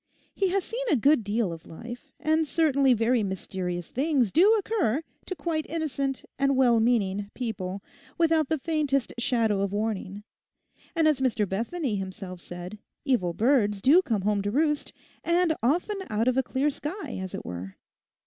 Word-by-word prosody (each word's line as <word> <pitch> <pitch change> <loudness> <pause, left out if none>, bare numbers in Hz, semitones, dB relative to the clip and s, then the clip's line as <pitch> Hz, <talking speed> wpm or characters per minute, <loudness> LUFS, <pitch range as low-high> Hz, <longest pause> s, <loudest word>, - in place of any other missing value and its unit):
He 390 - +1
has 380 +1 0
seen 485 +3 -3
a 310 - +4
good 275 +1 +4
deal 205 -3 0
of 165 - -11
life; 240 +8 -9
and 315 +1 +1
certainly 280 -4 +3
very 230 +2 +2
mysterious 185 -3 -4
things 265 - +1
do 400 +7 +6
occur 370 - 0 0.2
to 370 - -3
quite 315 0 -2
innocent 280 -4 -2
and 275 -1 +2
well 240 -3 +5
meaning 205 -4 +1
people 200 -5 -4 0.3
without 320 -3 +3
the 315 - +1
faintest 285 -3 0
shadow 230 -5 +1
of 200 -1 -1
warning, 205 -1 -3 0.7
and 325 -2 +3
as 300 -3 +3
Mr. 230 -5 +1
Bethany 230 - -2
himself 190 -1 -6
said, 180 +4 -8 0.3
evil 195 -11 +1
birds 215 -3 +2
do 295 - +6
come 220 - -1
home 205 0 +1
to 205 - -2
roost, 295 +5 0 0.3
and 340 -1 +2
often 350 - +1
out 220 +3 0
of 255 - +3
a 265 - +4
clear 270 +3 0
sky, 300 - -5
as 190 -1 -5
it - - -7
were. 90 +2 -6
250 Hz, 170 wpm, -27 LUFS, 205-310 Hz, 0.7 s, do